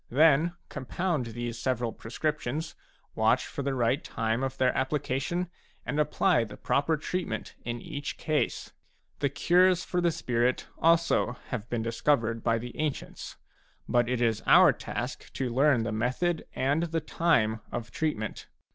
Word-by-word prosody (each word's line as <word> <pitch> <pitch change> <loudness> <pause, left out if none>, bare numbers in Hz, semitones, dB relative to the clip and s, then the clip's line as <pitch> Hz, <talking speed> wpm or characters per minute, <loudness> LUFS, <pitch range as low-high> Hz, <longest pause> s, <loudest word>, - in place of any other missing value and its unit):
Then 155 +4 +4
compound 145 +1 -2
these 120 0 -5
several 120 -2 -1
prescriptions, 150 +4 -3 0.4
watch - - +2
for - - -5
the 140 0 -1
right 120 +2 +1
time 115 +1 -1
of 135 0 -2
their 130 -1 +2
application, 140 +5 -1 0.4
and 145 - -2
apply 150 -2 +3
the 105 -1 -10
proper 155 +3 +1
treatment 155 -8 -3
in 120 0 -3
each 145 +4 -5
case. 155 -1 -1 0.5
The 140 - +1
cures 180 +5 +3
for 180 - -1
the 175 - +3
spirit 125 -5 0
also 165 -6 +3
have 120 -2 -4
been 115 -2 -1
discovered 115 -1 +1
by 115 -1 +2
the 120 +2 -7
ancients; 150 -3 -4 0.5
but 120 -1 +2
it 125 -1 +1
is 110 -2 +1
our - - +8
task - - -5
to 125 -3 -2
learn 135 -2 +4
the 115 - -2
method 130 +10 -1
and 140 +5 +1
the 165 -1 -1
time 120 -10 +1
of 115 -2 -5
treatment. 110 -7 -3
130 Hz, 150 wpm, -28 LUFS, 115-155 Hz, 0.5 s, our